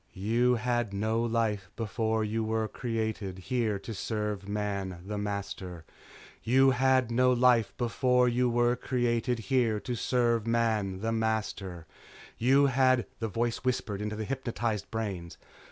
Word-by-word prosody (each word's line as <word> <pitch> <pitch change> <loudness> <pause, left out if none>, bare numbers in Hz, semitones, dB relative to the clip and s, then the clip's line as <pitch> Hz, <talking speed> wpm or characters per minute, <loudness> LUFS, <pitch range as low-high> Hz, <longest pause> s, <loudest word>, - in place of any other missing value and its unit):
" - - -36 0.2
you 125 +2 +4
had 120 -3 -1
no 110 +3 0
life 110 -5 0
before 110 0 -1
you 110 +1 -1
where 110 0 0
created 110 -5 -3
here 110 +1 -1
to 110 +3 -7
serve 105 -1 -3
Man 100 -3 -3
the 105 +1 -4
master 100 -4 -5 0.6
you 135 +3 +4
had 130 -1 +2
no 125 +2 +4
life 125 -3 +4
before 125 +1 +2
you 125 +1 +2
were 120 +1 +2
created 120 -1 0 0.2
here 115 -5 +3
to 125 - -3
serve 120 -1 +1
Man 110 -5 0
the 115 +1 -1
master 110 -6 -2 0.5
you 135 +4 +5
had 130 -3 +3
" - - -38
the 115 - -1
voice 115 +3 -1
whispered 115 -5 -2
into 105 0 -3
the 110 0 -4
hypnotized 120 -4 -2
brains. 100 -7 -4
115 Hz, 150 wpm, -29 LUFS, 105-120 Hz, 0.6 s, you